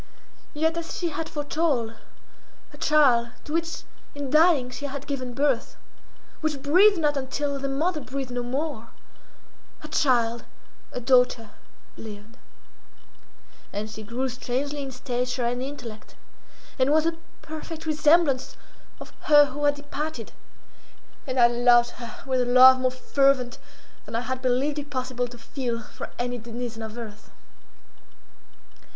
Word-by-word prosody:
Yet, 320 Hz, +2 st, +1 dB
as 335 Hz, 0 st, -5 dB
she 345 Hz, -, -1 dB
had 320 Hz, 0 st, -4 dB
foretold, 290 Hz, -6 st, -1 dB, 0.8 s
her -, -, -14 dB
child, 260 Hz, -6 st, +4 dB
to 300 Hz, -, -7 dB
which 330 Hz, 0 st, -2 dB, 0.3 s
in 285 Hz, -2 st, -4 dB
dying 305 Hz, -5 st, +4 dB
she 285 Hz, -, -6 dB
had 280 Hz, 0 st, -6 dB
given 255 Hz, -4 st, -4 dB
birth, 275 Hz, -3 st, 0 dB, 0.6 s
which 300 Hz, -4 st, -2 dB
breathed 375 Hz, +8 st, +6 dB
not 300 Hz, -3 st, +1 dB
until 280 Hz, +1 st, -2 dB
the 275 Hz, 0 st, -2 dB
mother 305 Hz, +4 st, 0 dB
breathed 265 Hz, -1 st, -5 dB
no 245 Hz, 0 st, -2 dB
more, 260 Hz, 0 st, -3 dB, 0.9 s
her 305 Hz, -, -8 dB
child, 240 Hz, -6 st, +2 dB, 0.5 s
a -, -, -4 dB
daughter, 250 Hz, -3 st, +3 dB, 0.5 s
lived. 215 Hz, +1 st, -10 dB, 1.4 s
And 215 Hz, +2 st, -4 dB
she 215 Hz, -, -8 dB
grew 235 Hz, +5 st, -3 dB
strangely 265 Hz, +4 st, -3 dB
in 275 Hz, -, -4 dB
stature 250 Hz, -1 st, -2 dB
and 245 Hz, +1 st, -1 dB
intellect, 250 Hz, -5 st, -8 dB, 0.6 s
and 260 Hz, +2 st, +3 dB
was 310 Hz, +1 st, +4 dB
the 330 Hz, 0 st, -1 dB, 0.2 s
perfect 315 Hz, +1 st, -7 dB
resemblance 305 Hz, -3 st, +3 dB, 0.4 s
of -, -, -11 dB
her 295 Hz, -1 st, +6 dB
who 290 Hz, +2 st, -2 dB
had 290 Hz, 0 st, +4 dB
departed, 290 Hz, -3 st, -5 dB, 1.0 s
and 255 Hz, -1 st, -1 dB
I 240 Hz, -, +8 dB
loved 240 Hz, 0 st, +4 dB
her 235 Hz, -2 st, -10 dB
with 260 Hz, -1 st, +1 dB
a -, -, +1 dB
love 255 Hz, +1 st, +8 dB
more 255 Hz, 0 st, +2 dB
fervent 255 Hz, -1 st, +1 dB, 0.5 s
than -, -, -7 dB
I 230 Hz, -, +1 dB
had 260 Hz, +1 st, -4 dB
believed 265 Hz, +4 st, +1 dB
it 290 Hz, 0 st, -7 dB
possible 255 Hz, -2 st, -2 dB
to 240 Hz, 0 st, -12 dB
feel 235 Hz, 0 st, -4 dB
for -, -, -8 dB
any 245 Hz, 0 st, -2 dB
denizen 235 Hz, 0 st, -6 dB
of 220 Hz, +1 st, -7 dB
earth. 215 Hz, -3 st, -9 dB
260 Hz, 145 wpm, -25 LUFS, 245-295 Hz, 1.4 s, I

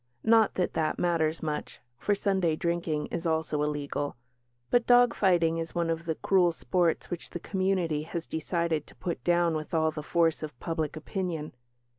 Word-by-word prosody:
Not 225 Hz, -1 st, +4 dB
that 180 Hz, -, 0 dB
that 155 Hz, -1 st, 0 dB
matters 165 Hz, -2 st, 0 dB
much, 150 Hz, -1 st, -4 dB, 0.2 s
for 205 Hz, -, +1 dB
Sunday 190 Hz, -5 st, +1 dB
drinking 170 Hz, -2 st, -1 dB
is 170 Hz, 0 st, -2 dB
also 160 Hz, -2 st, 0 dB
illegal. 145 Hz, -1 st, -2 dB, 0.6 s
But 240 Hz, -1 st, +3 dB
dog 245 Hz, -1 st, +6 dB
fighting 170 Hz, -3 st, +2 dB
is 165 Hz, +1 st, -5 dB
one 170 Hz, -1 st, +1 dB
of 165 Hz, +1 st, -3 dB
the 160 Hz, -1 st, -1 dB
cruel 180 Hz, -1 st, +3 dB
sports 165 Hz, +3 st, 0 dB
which 175 Hz, -, -5 dB
the 175 Hz, -, -6 dB
community 185 Hz, -5 st, 0 dB
has 165 Hz, +1 st, -5 dB
decided 160 Hz, -1 st, -1 dB
to -, -, -16 dB
put 175 Hz, -, -4 dB
down 175 Hz, -1 st, +3 dB
with 155 Hz, +2 st, -4 dB
all 160 Hz, 0 st, +3 dB
the 155 Hz, -, -5 dB
force 165 Hz, +1 st, +1 dB
of 150 Hz, -5 st, -7 dB
public 160 Hz, -2 st, -2 dB
opinion. 165 Hz, -2 st, -4 dB
165 Hz, 175 wpm, -28 LUFS, 155-175 Hz, 0.6 s, dog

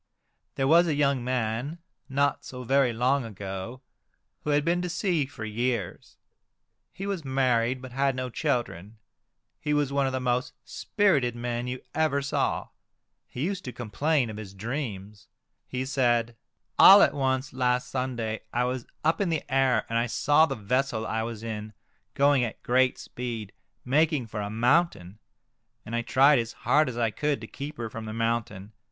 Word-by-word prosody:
There 135 Hz, -, 0 dB
was 170 Hz, +4 st, +6 dB
a 155 Hz, -, +1 dB
young 140 Hz, -3 st, +1 dB
man, 125 Hz, +4 st, -2 dB, 0.3 s
not 140 Hz, +1 st, +1 dB
so 125 Hz, -1 st, -8 dB
very 135 Hz, 0 st, +3 dB
long 125 Hz, +4 st, +1 dB
ago, 100 Hz, +3 st, -7 dB, 0.6 s
who -, -, -3 dB
had 145 Hz, 0 st, +2 dB
been 175 Hz, +1 st, +1 dB
to 180 Hz, -, -3 dB
sea 170 Hz, -5 st, 0 dB
for 120 Hz, -5 st, -8 dB
years. 115 Hz, -2 st, -3 dB, 0.7 s
He 195 Hz, -, -7 dB
was 195 Hz, -5 st, -3 dB
married, 130 Hz, -2 st, +1 dB
but 130 Hz, -, -8 dB
had 135 Hz, +1 st, +1 dB
no 130 Hz, -1 st, -4 dB
children. 115 Hz, -, -2 dB, 0.6 s
He 150 Hz, 0 st, -1 dB
was 145 Hz, -2 st, 0 dB
one 140 Hz, -1 st, +2 dB
of -, -, -1 dB
the 130 Hz, -, -2 dB
most 125 Hz, +1 st, -1 dB
spirited 145 Hz, -, +1 dB
men 120 Hz, 0 st, -3 dB
you 125 Hz, 0 st, -4 dB
ever 150 Hz, -3 st, +1 dB
saw. 140 Hz, -, -1 dB, 0.6 s
He 125 Hz, -, -5 dB
used 195 Hz, +1 st, -3 dB
to 125 Hz, -, -4 dB
complain 125 Hz, +3 st, 0 dB
of 105 Hz, -, -8 dB
his 100 Hz, -2 st, -9 dB
dreams. 105 Hz, -3 st, -5 dB, 0.4 s
He 130 Hz, 0 st, -3 dB
said, 120 Hz, -3 st, +1 dB, 0.2 s
" -, -, -36 dB
All 200 Hz, +1 st, +10 dB
at -, -, +3 dB
once 130 Hz, 0 st, -1 dB
last 125 Hz, -1 st, +1 dB
Sunday 120 Hz, -4 st, -3 dB
I 120 Hz, -, +1 dB
was 125 Hz, -1 st, -3 dB, 0.2 s
up 160 Hz, +5 st, +2 dB
in 195 Hz, -, +1 dB
the 160 Hz, -2 st, -1 dB
air, 130 Hz, -5 st, +3 dB
and 115 Hz, 0 st, 0 dB
I 120 Hz, -, 0 dB
saw 145 Hz, +6 st, +3 dB
the 135 Hz, -, -3 dB
vessel 115 Hz, +1 st, -1 dB
I 110 Hz, 0 st, -1 dB
was 115 Hz, -1 st, -5 dB
in 110 Hz, -1 st, -5 dB, 0.4 s
going 140 Hz, -2 st, +4 dB
at 110 Hz, -, -5 dB
great 125 Hz, +1 st, +2 dB
speed, 115 Hz, -4 st, -6 dB, 0.3 s
making 150 Hz, 0 st, +2 dB
for 105 Hz, -1 st, -5 dB
a 100 Hz, -, -4 dB
mountain, 115 Hz, -, +1 dB, 0.7 s
and 115 Hz, -, -4 dB
I 120 Hz, -, +1 dB
tried 135 Hz, +3 st, +5 dB
as 115 Hz, -1 st, -3 dB
hard 150 Hz, -2 st, +2 dB
as 120 Hz, -, -6 dB
I 115 Hz, -2 st, +1 dB
could 150 Hz, +3 st, -1 dB
to -, -, -6 dB
keep 145 Hz, +6 st, -7 dB
her 115 Hz, -, -3 dB
from 110 Hz, 0 st, -7 dB
the 110 Hz, -, -5 dB
mountain. 115 Hz, -3 st, -2 dB
125 Hz, 180 wpm, -27 LUFS, 115-140 Hz, 0.7 s, All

